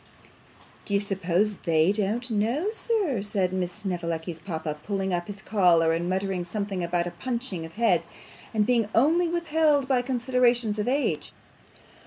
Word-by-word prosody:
'Do 200 - -1
you - - +4
suppose 195 0 0
THEY 165 +1 +3
don't 215 +4 -1
know, 235 - 0
sir?' 415 - -1
said 195 -3 -1
Miss 180 -1 -1
Snevellicci's 170 -4 -4
papa, 160 -3 -4
pulling 195 -2 -2
up 175 0 -1
his 200 -1 -8
collar, 175 -7 +4
and 170 +2 -1
muttering 190 -1 -1
something 195 0 -3
about 170 0 0
a 175 - -4
punching 235 -10 -4
of 165 - -17
heads, 230 +1 +2 0.4
and 215 -2 +2
being 230 -3 +2
only 325 +9 +4
withheld 320 -4 +2
by 260 -2 +3
considerations 245 -3 +1
of 210 - -1
age. 275 +3 0
205 Hz, 155 wpm, -26 LUFS, 180-245 Hz, 0.4 s, you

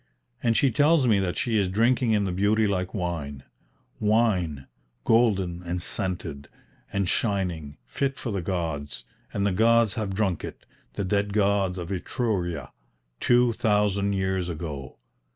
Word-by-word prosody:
And 115 -1 +2
she 135 - +3
tells 145 +3 +4
me 110 -4 +4
that 90 -2 -1
she 115 -3 +1
is 95 -2 +1
drinking 115 +5 +2
in 105 -2 +2
the 95 - -1
beauty 105 +4 +2
like 95 -2 -1
wine, 80 -8 -3 0.6
"wine, 100 -10 +1 0.4
golden 95 - +2
and 90 0 -3
scented, 85 -7 -4 0.4
and 100 -2 0
shining, 90 -9 -1
fit 135 - -2
for 120 - -4
the 100 -2 -2
gods; 80 -6 -3 0.3
and 100 -1 -1
the 100 - +2
gods 115 +2 +4
have 100 -3 -3
drunk 95 -5 0
it, - - -8 0.3
the 100 - -2
dead 100 +1 0
gods 100 -2 +2
of 90 +1 -5
Etruria, 90 - -2 0.5
two 120 -1 +4
thousand 105 -2 +1
years 95 -2 -1
ago. 75 -5 -6
100 Hz, 150 wpm, -26 LUFS, 85-110 Hz, 0.6 s, tells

